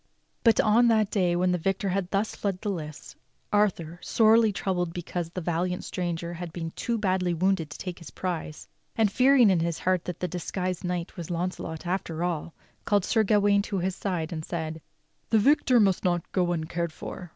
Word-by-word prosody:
But 230 -2 +5
on 230 +3 +5
the 220 -2 +4
day 180 -4 +2
when 180 +1 +2
the 180 - 0
victor 195 +3 -1
had 185 -1 -1
thus 200 +2 -1
fled 195 -3 -2
the 210 - -1
lists, 155 -6 -7 0.4
Arthur, 175 -5 +1
sorely 225 0 +4
troubled 180 -4 -2
because 175 -1 -4
the 180 +2 -5
valiant 175 +2 -1
stranger 170 -1 -3
had 175 0 -6
been 165 -1 -5
too 235 +6 -2
badly 185 -4 0
wounded 180 -2 +1
to - - -8
take 180 -2 -6
his 165 -6 -10
prize, 165 -1 -5 0.3
and 220 -3 +2
fearing 255 -2 +5
in 180 - +3
his 165 0 -1
heart 185 -1 0
that 180 - -5
the 180 - -1
dis 175 0 -5
guised 185 -1 -2
knight 180 -1 -3
was 170 -3 -6
Launcelot 170 -2 -4
after 175 -2 -2
all, 170 -2 -3 0.3
called 205 -3 +2
Sir 225 - +3
Gawain 205 -1 +3
to 200 -1 -3
his 185 +1 -1
side 175 -4 -3
and 155 -1 -4
said: 160 -1 -4 0.5
"The 225 - +4
victor 260 +1 +4
must 195 -4 +3
not 175 -2 0
go 180 -2 +1
uncared 170 0 -2
for. 180 +2 -8
180 Hz, 195 wpm, -27 LUFS, 170-200 Hz, 0.5 s, But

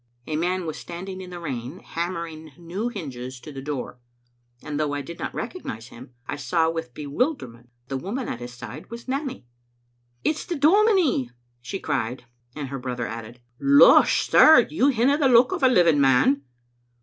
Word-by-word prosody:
A 155 - -3
man 180 +3 -1
was 155 - -5
standing 185 +2 -7
in 185 - -9
the 175 -1 -7
rain, 135 -2 -5
hammer 170 0 -4
ing 155 -2 -11
new 175 +6 -4
hinges 130 - -7
to 150 - -10
the 135 -2 -7
door; 135 -3 -5 0.6
and 150 -1 -4
though 150 -2 0
I 145 - -3
did 170 +3 -9
not - - -3
recognize 115 - -6
him, 125 +3 -13
I - - -4
saw 160 +4 +1
with 160 -7 -6
bewilderment 140 - -3 0.2
that - - -35
the - - -9
woman 235 +7 -3
at 115 - -4
his 120 0 -7
side 125 +4 -10
was 235 +2 -9
Nanny. 270 - -3 0.4
" 120 0 -43
It's 310 - 0
the 350 - -4
dominie," 335 - +3 0.3
she 190 +10 -5
cried, 125 -3 -3 0.3
and 145 -3 -5
her 135 0 -5
brother 125 -2 -4
added: 115 +2 -8
'* 120 - -42 0.2
Losh, - - +6
sir, 315 - +7
you 295 -3 +2
hinna 275 +2 +3
the 275 -3 +4
look 250 +5 +5
o' 370 - -2
a 260 - +6
living 170 - +4
man." 135 +1 +3
155 Hz, 190 wpm, -24 LUFS, -, 0.6 s, sir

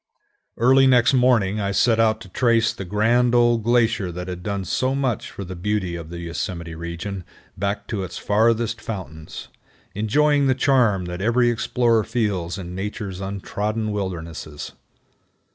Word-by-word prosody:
Early 130 +3 +5
next 125 0 +5
morning 120 -6 +3
I 100 -1 -1
set 115 +2 +3
out 110 -1 +2
to 110 - -10
trace 115 +2 +2
the 95 - -7
grand 115 +5 +2
old 120 -1 +4
glacier 115 -5 +2
that 90 +1 -6
had 90 -1 -5
done 100 0 -3
so 130 +9 0
much 130 -5 -1
for 100 - -7
the 95 0 -7
beauty 95 -1 -2
of 85 -2 -7
the 85 - -7
Yosemite 85 0 -5
region 85 +4 -5 0.3
back 100 +2 -2
to 105 -4 -2
its 90 -2 -6
farthest 115 +2 +1
fountains, 80 -7 -7 0.4
enjoying 140 +7 +2
the 130 - +3
charm 125 -9 +2
that 90 +1 -5
every 120 +3 +3
explorer 115 -1 +1
feels 100 -7 -2
in 90 -2 -7
Nature's 95 0 -5
untrodden 105 +3 -3
wildernesses. 85 -6 -5
105 Hz, 155 wpm, -22 LUFS, 90-120 Hz, 0.4 s, Early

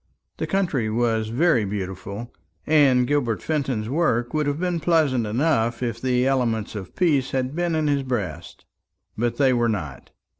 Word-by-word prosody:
The - - -3
country 170 - 0
was 110 -1 0
very 125 +1 +2
beautiful, 100 +3 -5 0.3
and 140 -5 +4
Gilbert 125 -5 0
Fenton's 135 -8 -1
work 120 -4 0
would 155 -1 0
have 145 +1 -1
been 180 -1 -1
pleasant 150 -9 +2
enough 120 -1 0
if 115 -1 -3
the 125 -1 +1
elements 120 -5 0
of 100 -4 -8
peace 145 -8 +2
had 130 +1 -2
been 175 -1 0
in 155 -1 0
his 145 -1 +1
breast. 100 -11 -5 0.5
But 120 +1 -1
they 135 -2 +4
were 120 -1 +2
not. 75 -12 -4
125 Hz, 160 wpm, -23 LUFS, 110-145 Hz, 0.5 s, and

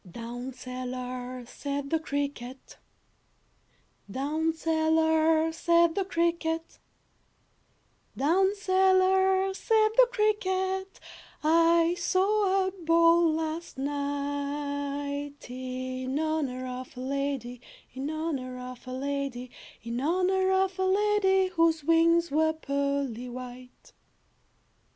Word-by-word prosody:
I 185 - -15
"Down 240 +6 -6
cellar," 255 0 -6
said 280 +3 -5
the 325 - +2
cricket, 280 -4 -5 1.3
"Down 300 +8 -1
cellar," 320 0 +2
said 340 0 +3
the 390 +2 -1
cricket, 335 -2 -1 1.4
"Down 380 +8 +2
cellar," 380 -1 +3
said 435 +2 +2
the - - +7
cricket, 380 -4 -1 0.4
"I 335 +1 +4
saw 390 0 +2
a - - -2
ball 335 -2 +4
last 320 0 -4
night, 285 0 -3
In 255 +1 -4
honor 300 -5 -2
of 255 0 -7
a - - -5
lady, 265 -2 -3 0.3
In 265 +3 -4
honor 300 -5 -3
of 250 0 -9
a - - -6
lady, 270 -2 -3 0.3
In 235 +2 -3
honor 370 +4 +1
of 380 0 +1
a - - +2
lady, 385 -1 +3
Whose 330 -3 +2
wings 335 +1 +3
were 315 +2 +2
pearly 280 -5 -2
white. 250 0 -10
315 Hz, 100 wpm, -28 LUFS, 260-355 Hz, 1.4 s, the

